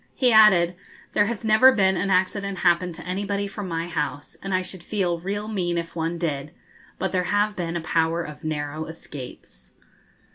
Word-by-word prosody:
He 250 -2 +3
added, 185 -5 +6 0.4
'There 205 - +3 0.2
never 220 +4 +7
has - - -5
been 190 -1 +4
an 190 +2 -1
accident 190 +1 +1
happen 175 +1 +3
to 165 0 -10
anybody 200 +2 -2
from 200 0 -6
my 165 -1 -2
house, 150 -3 -4
and 195 - -5
I 185 0 +1
should 185 -1 -7
feel 175 -3 -1
real 205 +4 -3
mean 180 -5 -1
if 170 0 -4
one 165 +1 -2
did: 150 -2 -3 0.4
but 190 - -2
there 180 -1 0
have 205 +2 +1
been 170 -1 -3
a 170 - -1
power 165 +1 +1
of 150 -2 -10
narrow 155 0 -3
escapes.' 130 - -11
180 Hz, 185 wpm, -24 LUFS, 165-200 Hz, 0.4 s, never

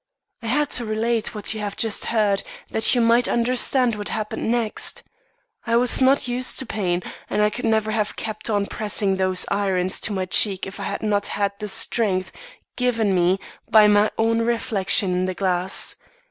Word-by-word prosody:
"I 230 - -6
had 290 +5 0
to 245 - +3
relate 225 +1 -1
what 210 +1 -2
you 220 - -6
have 205 -1 -5
just 225 -2 0
heard, 210 -3 +2 0.3
that 220 - +3
you 245 - +2
might 235 +1 +3
understand 250 +1 +1
what 205 -1 -4
happened 215 0 -3
next. 230 -2 0 0.6
I 230 - +1
was 245 +2 +4
not 260 0 +3
used 245 +1 0
to 265 - 0
pain, 180 -6 -2 0.3
and 210 - +1
I 210 - +2
could 240 +3 -5
never 220 -1 +1
have 215 -1 -2
kept 215 0 -6
on 205 -2 0
pressing 205 -2 0
those 185 -1 +1
irons 190 -2 0
to - - 0
my 190 -2 -2
cheek 190 +1 +2
if 195 - -9
I - - -4
had - - -4
not 205 -1 0
had 200 -1 -1
the 210 - -4
strength 190 -2 0 0.4
given 230 -5 0
me 180 +1 +2 0.3
by 215 -1 +6
my 210 +1 +4
own 225 +1 +1
reflection 215 -4 +1
in 180 +1 0
the 185 0 -3
glass. 185 0 -1
215 Hz, 190 wpm, -22 LUFS, 195-230 Hz, 0.6 s, by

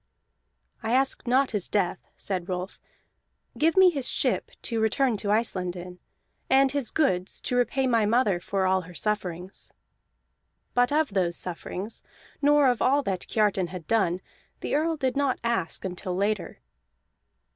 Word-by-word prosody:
"I 225 +1 -1
ask 265 -1 +1
not 260 +2 +3
his 210 -5 -2
death," 195 -4 0 0.2
said 185 -2 -3
Rolf. 180 +1 -4 0.8
"Give 325 +4 +2
me 375 -1 +8
his 275 -6 -2
ship - - 0
to 230 -2 -1
return 225 +3 +2
to 205 - -3
Iceland 195 -5 0
in, 180 0 -9 0.5
and 270 0 +5
his 280 -5 0
goods 185 - 0
to 250 - -2
repay 255 +2 +1
my 230 -4 +3
mother 215 -5 +2
for 190 +2 -1
all 190 0 +2
her 180 0 -13
sufferings." 185 -2 -3 1.0
But 245 +1 +3
of 305 0 +2
those 180 -4 +1
sufferings, 185 +4 -5 0.4
nor 290 -1 +5
of 245 -3 +1
all 280 +2 +3
that 190 -6 -3
Kiartan 205 -4 +1
had 175 -2 -8
done, 185 -4 +1 0.4
the - - -3
Earl 320 +2 +1
did 265 -2 -1
not 280 -2 +1
ask 195 -8 -1
until 180 0 -4
later. 200 +1 -2
215 Hz, 155 wpm, -26 LUFS, 185-265 Hz, 1.0 s, me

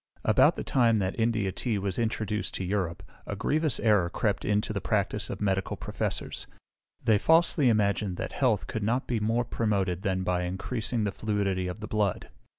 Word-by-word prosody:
About - - +5
the - - -4
time 115 -4 +3
that 95 +2 -2
India 110 -4 +1
tea 110 +3 -1
was 100 0 -2
introduced 110 -2 -2
to - - -3
Europe, 90 -2 -2 0.2
a 100 - -3
grievous 150 +6 0
error 105 -6 +3
crept - - -1
into 105 +1 0
the 100 - -2
practice 105 +1 -1
of - - -5
medical 95 -2 0
professors; - - -4 0.6
they 110 -2 +4
falsely 160 -3 +4
imagined 100 -3 +1
that - - -4
health 120 -7 +1
could 110 - -4
not 115 +5 0
be 120 -2 -1
more 115 +3 +1
promoted 100 -6 0
than 95 -2 -1
by 90 -1 0
increasing 110 +6 -2
the 100 - 0
fluidity 100 -3 -1
of 90 +4 -6
the 110 - -5
blood. 105 -4 -1
105 Hz, 180 wpm, -28 LUFS, 95-115 Hz, 0.6 s, About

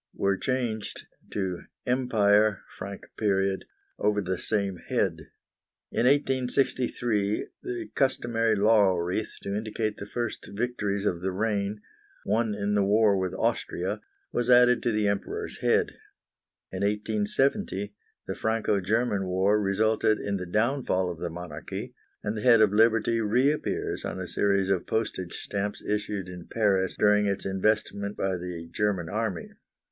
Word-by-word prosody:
were 100 0 +1
changed 120 -2 -2 0.2
to 95 -3 -2 0.2
"EMPIRE 110 -5 +3
FRANC." 100 0 -7 1.0
over 105 0 +2
the 95 -2 -2
same 100 -3 -1
head. - - 0 0.6
In 120 - +2
1863 125 -5 +1 0.2
the 360 -2 -4
customary 115 -4 +1
laurel 100 -3 +4
wreath, 90 +5 -2
to 100 0 -3
indicate 110 0 -2
the 100 - -7
first 120 +1 -4
victories 105 -3 -1
of 85 -4 0
the 95 +1 -1
reign, 105 +1 -1 0.4
won 110 +1 +1
in 105 0 -1
the 100 -1 +3
war 105 +1 +4
with 95 -1 -1
Austria, - - -1 0.3
was 120 0 -1
added 125 0 +6
to 120 - +1
the 105 -1 +1
Emperor's 100 0 -3
head. - - +3 0.8
In 95 - -4
1870 105 - 0 0.3
the - - -3
Franco 110 -2 0
German 105 0 0
War 95 +3 +2
resulted 110 +2 +2
in 100 -1 -2
the 90 -1 -5
downfall 105 -3 +1
of 85 - -9
the 85 - -3
monarchy, 85 -2 -7 0.3
and 105 +1 -2
the 105 - -3
head 120 -1 +6
of 105 -2 +4
Liberty 115 +1 +3
reappears 125 +8 0
on - - -4
a 95 - -4
series 100 +2 +1
of 95 -3 0
postage 95 -5 -2
stamps 100 0 -3
issued 105 -2 -2
in 90 -1 -9
Paris 100 -4 +1
during 105 0 +4
its 100 -1 -2
investment 100 +1 0
by 95 -1 0
the 90 -2 -6
German 100 -5 0
army. 105 -2 -3
105 Hz, 140 wpm, -27 LUFS, 95-115 Hz, 1.0 s, added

